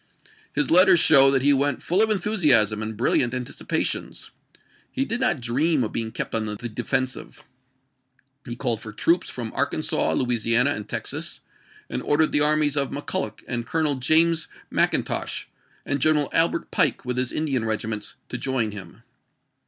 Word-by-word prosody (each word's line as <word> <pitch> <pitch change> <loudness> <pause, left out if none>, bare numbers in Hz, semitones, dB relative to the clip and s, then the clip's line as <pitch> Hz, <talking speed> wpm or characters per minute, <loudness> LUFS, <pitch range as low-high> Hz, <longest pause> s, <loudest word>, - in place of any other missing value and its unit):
His 145 -2 -1
letters 180 +1 +6
show 135 -4 +6
that 135 -1 +1
he 145 +1 +5
went 140 +1 -1
full 180 +4 +2
of 220 - +2
enthusiasm 150 - +3
and 110 0 -5
brilliant 120 +1 +1
anticipations. 125 -1 -3 0.6
He 270 0 -2
did 230 -1 -3
not 175 - 0
dream 135 +5 +1
of 110 - -4
being 115 -1 -3
kept - - -5
on 110 -1 0
the 105 -1 -4
defensive. 130 +3 -4 1.0
He 120 - -5
called 115 -1 -1
for 105 - -9
troops 170 +11 0
from 115 -3 -6
Arkansas, 145 +3 0
Louisiana, 120 +1 +2
and 105 -6 -5
Texas, - - -4 0.5
and - - -5
ordered 155 +1 +1
the 145 - +3
armies 150 -1 +2
of 140 -2 +1
McCulloch 125 -6 -5
and 120 -1 -2
Colonel 160 -3 +1
James 155 +5 +3 0.2
Mcin - - +2
tosh, - - -3 0.4
and 145 -1 -2
General 150 -1 +2
Albert 165 0 +1
Pike - - +1
with 125 0 -3
his 125 -1 0
Indian 140 -6 -1
regi 110 -1 -2
ments, 105 -1 -4
to - - -5
join 125 -5 -1
him. 100 +2 -10
135 Hz, 165 wpm, -23 LUFS, 115-155 Hz, 1.0 s, letters